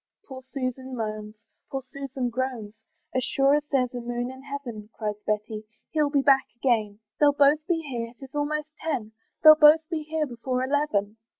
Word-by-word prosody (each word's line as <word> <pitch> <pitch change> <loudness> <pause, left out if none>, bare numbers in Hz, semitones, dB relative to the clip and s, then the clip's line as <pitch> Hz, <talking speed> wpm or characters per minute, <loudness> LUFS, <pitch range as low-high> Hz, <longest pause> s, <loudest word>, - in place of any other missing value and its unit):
Poor 260 -1 -8
Susan 260 -1 -4
moans, 215 -2 -4 0.3
poor 270 -1 -4
Susan 265 -3 -4
groans, 240 -4 -3 0.4
"As 255 - 0
sure 275 +1 +3
as 295 0 +2
there's 255 -3 +1
a 245 - -4
moon 240 +1 -3
in 260 0 -11
heaven," 260 -7 -7
Cries 210 -1 -4
Betty, 215 0 -2 0.3
"he'll 300 -2 +2
be 285 -1 +2
back 270 -1 +5
again; 220 -5 0 0.2
"They'll 290 -1 +5
both 285 +1 +5
be 330 -2 0
here, 235 -3 -4
'tis 270 -1 -11
almost 295 +1 -1
ten, 255 -9 -3 0.3
"They'll 310 -1 +12
both 310 +1 +6
be 320 -2 -1
here 310 0 -1
before 255 0 -3
eleven." 260 -7 0
260 Hz, 175 wpm, -26 LUFS, 235-290 Hz, 0.4 s, They'll